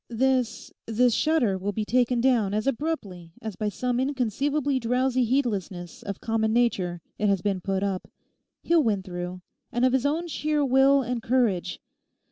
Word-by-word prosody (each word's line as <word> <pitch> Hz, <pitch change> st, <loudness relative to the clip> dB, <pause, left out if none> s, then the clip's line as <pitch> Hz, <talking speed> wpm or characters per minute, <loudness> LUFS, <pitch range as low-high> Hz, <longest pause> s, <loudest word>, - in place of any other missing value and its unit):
This—this 245 Hz, -1 st, 0 dB
shutter 240 Hz, -10 st, +2 dB
will 200 Hz, +2 st, -2 dB
be 215 Hz, 0 st, -2 dB
taken 245 Hz, +1 st, +2 dB
down 230 Hz, -6 st, +2 dB
as 215 Hz, -, -1 dB
abruptly 225 Hz, -, -3 dB
as 220 Hz, -3 st, -6 dB
by 210 Hz, -1 st, -1 dB
some 245 Hz, +4 st, -1 dB
inconceivably 275 Hz, +2 st, 0 dB
drowsy 255 Hz, +2 st, +1 dB
heedlessness 200 Hz, -, -2 dB
of 200 Hz, -1 st, -6 dB
common 225 Hz, -1 st, 0 dB
Nature 190 Hz, -7 st, +1 dB, 0.2 s
it 210 Hz, -, +2 dB
has 195 Hz, -3 st, +1 dB
been 195 Hz, -3 st, 0 dB
put 195 Hz, +1 st, -1 dB
up. 195 Hz, -2 st, -2 dB, 0.6 s
He'll 335 Hz, -1 st, +4 dB
win 210 Hz, -7 st, 0 dB
through; 180 Hz, 0 st, -6 dB, 0.3 s
and 240 Hz, +2 st, +2 dB
of 255 Hz, -, +3 dB
his 265 Hz, +1 st, +2 dB
own 320 Hz, +4 st, -1 dB
sheer 300 Hz, -1 st, 0 dB
will 270 Hz, +1 st, +4 dB
and 245 Hz, -1 st, -3 dB
courage. 220 Hz, -8 st, 0 dB
235 Hz, 160 wpm, -26 LUFS, 200-265 Hz, 0.6 s, He'll